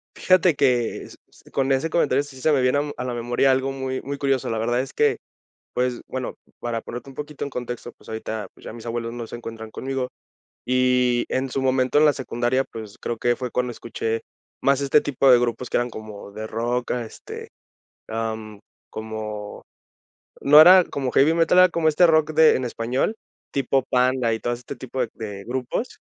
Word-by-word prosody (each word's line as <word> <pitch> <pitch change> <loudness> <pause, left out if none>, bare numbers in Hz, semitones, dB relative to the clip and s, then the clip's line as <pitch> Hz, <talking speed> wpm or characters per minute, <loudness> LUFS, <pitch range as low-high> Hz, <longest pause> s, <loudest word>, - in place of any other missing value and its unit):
Fíjate 185 -3 +4
que 125 -4 +1
s - - -13
s - - -22
con 135 0 0
ese 135 +5 0
comentario, 145 -4 +2
sí 140 -2 -12
se 155 - +2
me 135 - +3
viene, 125 +2 +3
am, 145 0 -1
a - - -4
la 125 -1 -3
memoria 120 +3 +2
algo 130 +1 0
muy 130 -1 -3
muy 140 +1 -5
curioso. 135 -2 0
La 115 - -1
verdad 120 +2 0
es 130 - -4
que, 445 -1 +2 0.6
pues, 125 -1 -1
bueno, 130 -1 -4 0.2
para 115 -1 -3
ponerte 120 +4 -8
un 135 - -13
poquito 150 +1 -6
en - - -5
contexto, 120 -2 -6
pues, - - -18
ahorita, 110 -1 -4
pues, - - -20
ya - - -7
mis 115 0 -10
abuelos 115 0 -3
no 120 0 -6
se 115 - -8
encuentran 110 -1 -8
conmigo. 130 0 -3 0.6
Y 125 -1 +3
en 130 +1 0
su 135 +1 -2
momento 130 0 +2
en 150 - +6
la 150 - +6
secundaria, 130 -1 0
pues, 110 -2 -8
creo 120 - -3
que 120 +1 +1
fue 125 0 -4
cuando 125 +1 -1
escuché 115 -1 -3 0.4
más 140 0 +2
este 140 +2 +4
tipo 135 -1 +2
de 125 - +8
grupos 120 +1 -2
que - - +2
eran 120 0 0
como 110 -3 -9
de 110 +2 -6
rock, 120 +3 -2
este, 120 -3 -6 0.6
am, 110 -2 -4 0.3
como, 110 -1 -6 0.8
no 150 +2 +8
era 180 +3 +9
como 135 -5 -3
heavy 145 +4 +5
metal, 165 +1 +3
era 185 0 +8
como 165 -1 +1
este 155 +3 +5
rock 155 -1 +3
de 160 0 +6
en 130 - -2
español, 120 - -1 0.4
tipo 135 0 +1
Panda 125 -2 +2
y - - -3
todo 120 - -1
este 125 +3 -6
tipo 130 +1 -6
de 125 - +1
de 100 -3 -7
grupos. 130 - -3
125 Hz, 200 wpm, -23 LUFS, 115-135 Hz, 0.8 s, era